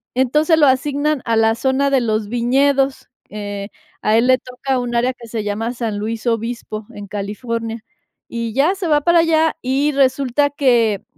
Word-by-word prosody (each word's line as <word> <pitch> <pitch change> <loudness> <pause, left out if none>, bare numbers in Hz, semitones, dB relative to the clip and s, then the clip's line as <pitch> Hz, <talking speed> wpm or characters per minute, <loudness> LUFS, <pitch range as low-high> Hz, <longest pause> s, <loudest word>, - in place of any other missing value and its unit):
Entonces, 300 +6 +2
lo 295 - +6
asignan 285 +2 +1
a 230 - +1
la 225 0 +3
zona 265 +4 +1
de 270 -2 +3
los 215 -2 -1
viñedos. 270 +3 +1 0.2
Eh, 205 -1 -6 0.3
a 215 +1 +2
él 235 +2 +3
le 255 0 +5
toca 260 +1 -3
un 245 -1 -4
área 245 +2 +1
que 240 -2 -13
se 220 -2 -3
llama 220 +3 -2
San 230 -4 -3
Luis 225 +2 -4
Obispo, 230 -2 -3
en 205 0 -9
California. 225 +3 -4 0.5
Y 230 -2 -4
ya 305 +8 +2
se 375 -3 -4
va 295 -1 +3
para 340 +3 +4
allá 320 -1 +2
y 270 +4 +1
resulta 275 +1 +2
que 235 -8 +2
245 Hz, 175 wpm, -19 LUFS, 225-275 Hz, 0.5 s, lo